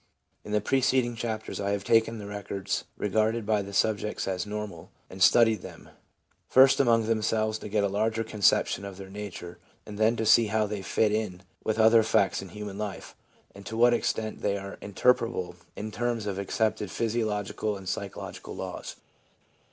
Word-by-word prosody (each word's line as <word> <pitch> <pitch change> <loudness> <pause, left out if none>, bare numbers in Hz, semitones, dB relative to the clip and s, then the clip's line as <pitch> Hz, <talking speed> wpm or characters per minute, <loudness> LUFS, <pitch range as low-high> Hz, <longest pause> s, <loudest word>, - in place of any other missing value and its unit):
In 105 - -8
the 105 0 +2
preceding 130 0 +2
chapters 110 -2 -4
I 100 - -1
have 100 -1 -2
taken 115 +1 +3
the 105 - -7
records 100 -1 -4
regarded 110 +2 0
by 105 -1 +2
the 100 0 -7
subjects 105 +2 0
as 95 +1 -2
normal, 105 -5 -6 0.2
and 95 - -9
studied 110 +3 +5
them, - - -11 0.6
first 130 +1 +6
among 115 -4 +4
themselves 110 -1 0
to - - -7
get 105 0 +1
a - - +3
larger 110 +3 0
conception 105 -2 +2
of 100 -2 -7
their 95 -1 -10
nature, 95 -4 -8 0.3
and 105 -1 -9
then 110 +2 +4
to 110 - -2
see 110 +1 +6
how 110 +1 +1
they 105 -1 -4
fit 105 +3 +1
in 105 -4 -2 0.2
with 110 0 -1
other 110 +1 +6
facts 100 -3 +2
in 95 - -9
human 105 +1 -7
life, 100 -3 -6 0.4
and 100 - -12
to 110 - -5
what 120 +1 +6
extent 110 -2 -2
they 100 -1 0
are 100 0 -7
interpretable 115 -3 0 0.2
in 110 +1 -5
terms 115 0 -2
of 100 -2 -3
accepted 105 +1 -1
physiological 105 -1 -2
and 95 -1 -11
psychological - - -5
laws. - - -6
105 Hz, 175 wpm, -28 LUFS, 100-110 Hz, 0.6 s, first